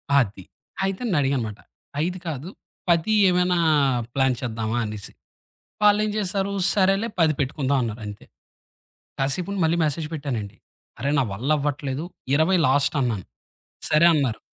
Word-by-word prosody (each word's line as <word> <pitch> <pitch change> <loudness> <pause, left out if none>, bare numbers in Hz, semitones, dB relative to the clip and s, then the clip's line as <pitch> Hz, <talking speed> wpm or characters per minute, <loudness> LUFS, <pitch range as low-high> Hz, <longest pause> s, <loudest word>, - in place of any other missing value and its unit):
అది. 100 -8 +1 0.4
అయితే 195 +3 -2
నన్ను 185 -9 +1
అడిగాను 135 -2 +1
అన్నమాట, 105 - -15 0.5
5 180 +1 -3
కాదు 155 +3 -4 0.4
10 170 +6 +3 0.2
ఏమైనా 180 0 +2 0.6
ప్లాన్ 130 -2 +2
చేద్దామా 110 -1 -2
అనేసి. 105 -1 -7 0.7
వాళ్ళేం 210 0 +4
చేసారు, 200 0 -1 0.2
సరేలే 195 +3 +2
10 160 -2 +4
పెట్టుకుందాం 140 0 0
అన్నారు 110 0 -4
అంతే. 105 0 -9 0.9
కాసేపుండి 180 +8 -1
మళ్ళి 165 +2 +1
మెసేజ్ 150 +1 -2
పెట్టానండి, 125 -9 -4 0.4
అరె 140 +1 0
నా - - +3
వల్ల 125 +9 -4
అవ్వట్లేదు 145 +1 -2 0.3
20 170 +5 +3
లాస్ట్ 140 +3 +2
అన్నాను, 110 -7 -1 0.6
సరే 155 +2 +5
అన్నారు. 135 -7 0
145 Hz, 130 wpm, -24 LUFS, 130-180 Hz, 0.9 s, సరే